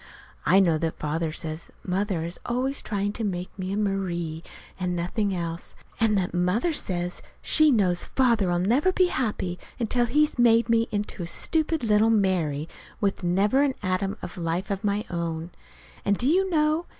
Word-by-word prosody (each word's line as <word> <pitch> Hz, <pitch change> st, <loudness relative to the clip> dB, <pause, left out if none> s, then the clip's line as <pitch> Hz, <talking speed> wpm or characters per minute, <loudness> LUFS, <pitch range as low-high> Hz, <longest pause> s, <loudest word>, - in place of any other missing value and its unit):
I 185 Hz, +5 st, +6 dB
know 170 Hz, -5 st, +3 dB
that 165 Hz, 0 st, -2 dB
Father 155 Hz, +2 st, -2 dB
says 160 Hz, 0 st, -6 dB
that -, -, -21 dB
Mother 185 Hz, -2 st, -1 dB
is 170 Hz, +1 st, -4 dB
always 260 Hz, +3 st, -1 dB
trying 205 Hz, -1 st, -2 dB
to 230 Hz, -, -4 dB
make 180 Hz, -3 st, -2 dB
me 185 Hz, 0 st, -3 dB
a 200 Hz, -, -1 dB
"Marie," 175 Hz, -6 st, -2 dB, 0.4 s
and 180 Hz, -1 st, -1 dB
nothing 195 Hz, +4 st, -1 dB
else; 170 Hz, -1 st, -4 dB, 0.2 s
and 220 Hz, -2 st, +3 dB
that 180 Hz, -2 st, -1 dB
Mother 180 Hz, -, +1 dB
says 180 Hz, -9 st, -1 dB, 0.2 s
she 310 Hz, -1 st, +5 dB
knows 190 Hz, -9 st, +3 dB
Father'll 220 Hz, -9 st, +2 dB
never 245 Hz, -, +2 dB
be 365 Hz, -1 st, +3 dB
happy 205 Hz, -, -2 dB, 0.2 s
until 240 Hz, +1 st, +1 dB
he's 300 Hz, +2 st, +2 dB
made 230 Hz, -1 st, +5 dB
me 230 Hz, 0 st, +3 dB
into 205 Hz, -2 st, -3 dB
a 170 Hz, -, -4 dB
stupid 320 Hz, -, +1 dB
little 215 Hz, 0 st, +4 dB
"Mary," 180 Hz, -8 st, +1 dB, 0.3 s
with 200 Hz, -2 st, -1 dB
never 200 Hz, +9 st, +2 dB
an 280 Hz, -2 st, +1 dB
atom 185 Hz, +1 st, -1 dB
of 180 Hz, -, -6 dB
life 170 Hz, +4 st, -2 dB
of 195 Hz, -1 st, -3 dB
my 205 Hz, +1 st, 0 dB
own. 170 Hz, -1 st, -3 dB, 0.5 s
And, 200 Hz, 0 st, +1 dB
do 245 Hz, -, -2 dB
you 375 Hz, +5 st, +3 dB
know? 310 Hz, 0 st, +1 dB
195 Hz, 175 wpm, -26 LUFS, 175-235 Hz, 0.5 s, I